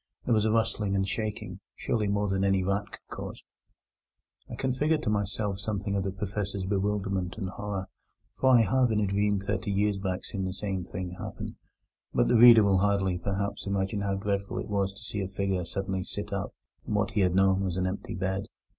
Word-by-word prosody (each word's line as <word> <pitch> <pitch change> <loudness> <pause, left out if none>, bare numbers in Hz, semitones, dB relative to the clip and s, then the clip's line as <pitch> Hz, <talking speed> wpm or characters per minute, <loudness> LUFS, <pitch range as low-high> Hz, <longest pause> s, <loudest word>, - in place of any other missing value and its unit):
There 120 - +2
was 110 -1 +3
a 110 - +3
rustling 105 -3 +1
and 95 0 +1
shaking: 105 -2 -3 0.2
surely 110 -3 0
more 100 +1 +1
than 95 0 0
any 95 -1 +3
rat 100 +2 0
could - - -11
cause. - - -7 1.1
I - - -5
can 130 - -1
figure 150 +5 +2
to 125 -8 -1
myself 100 -1 -1
something 100 -1 -2
of 100 - +1
the 95 - -2
Professor's 100 -1 -3
bewilderment 95 -2 -1
and 95 -4 -3
horror, 100 -1 -4 0.5
for 130 - +2
I 125 -3 +7
have 125 +3 +3
in 105 - +2
a 105 - +2
dream 100 +1 +1
thirty 105 +2 -2
years 100 0 +1
back 95 -1 -2
seen 100 -3 -3
the 95 - -2
same 95 -2 -2
thing 90 0 -5
happen; - - -6 0.6
but - - +4
the 125 - +3
reader 115 -1 +9
will 100 -2 +4
hardly, 95 -2 +1
perhaps, 100 +2 -2
imagine 100 +1 0
how 100 -1 0
dreadful 100 0 -2
it - - -3
was 100 -1 +1
to - - -24
him - - -14
to 110 - -10
see 105 -1 -3
a 95 - -2
figure 95 -3 0
suddenly 95 +1 -2
sit - - -6
up - - -3 0.3
in 105 - -1
what 105 -1 +1
he 105 - +1
had 90 -1 +2
known 95 0 +4
was 90 -2 -2
an 95 - +1
empty 95 +2 -3
bed. 95 +1 -2
100 Hz, 215 wpm, -28 LUFS, 95-105 Hz, 1.1 s, reader